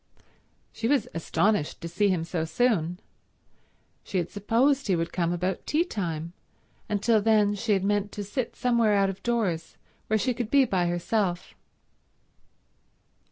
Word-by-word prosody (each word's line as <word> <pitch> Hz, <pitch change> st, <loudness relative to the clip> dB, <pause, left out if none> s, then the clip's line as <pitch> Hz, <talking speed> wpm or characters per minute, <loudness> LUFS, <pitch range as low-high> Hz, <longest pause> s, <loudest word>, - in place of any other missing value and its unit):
She 225 Hz, -, -2 dB
was 280 Hz, +1 st, +2 dB
astonished 165 Hz, +1 st, 0 dB
to 170 Hz, -, -4 dB
see 185 Hz, +5 st, +1 dB
him 180 Hz, -4 st, 0 dB
so 165 Hz, -1 st, -2 dB
soon. 175 Hz, -1 st, 0 dB, 1.0 s
She 195 Hz, -, -3 dB
had 175 Hz, -2 st, -1 dB
supposed 250 Hz, +7 st, +1 dB
he 190 Hz, -, +3 dB
would 165 Hz, 0 st, -2 dB
come 170 Hz, -1 st, 0 dB
about 180 Hz, +2 st, -2 dB
tea 315 Hz, +3 st, +2 dB
time, 170 Hz, -, -4 dB, 0.6 s
and 205 Hz, -1 st, -1 dB
till 225 Hz, -2 st, +4 dB
then 210 Hz, -1 st, +3 dB
she 210 Hz, +1 st, 0 dB
had 190 Hz, -2 st, +1 dB
meant 205 Hz, 0 st, 0 dB
to 205 Hz, -, -4 dB
sit 225 Hz, +5 st, -3 dB
somewhere 235 Hz, -4 st, +2 dB
out 195 Hz, -1 st, +3 dB
of 195 Hz, 0 st, -12 dB
doors 205 Hz, -9 st, -1 dB, 0.3 s
where 220 Hz, -, +2 dB
she 230 Hz, +5 st, 0 dB
could 230 Hz, -2 st, -4 dB
be 275 Hz, 0 st, +5 dB
by 185 Hz, -6 st, 0 dB
herself. 175 Hz, +1 st, -1 dB
205 Hz, 160 wpm, -27 LUFS, 175-225 Hz, 1.0 s, be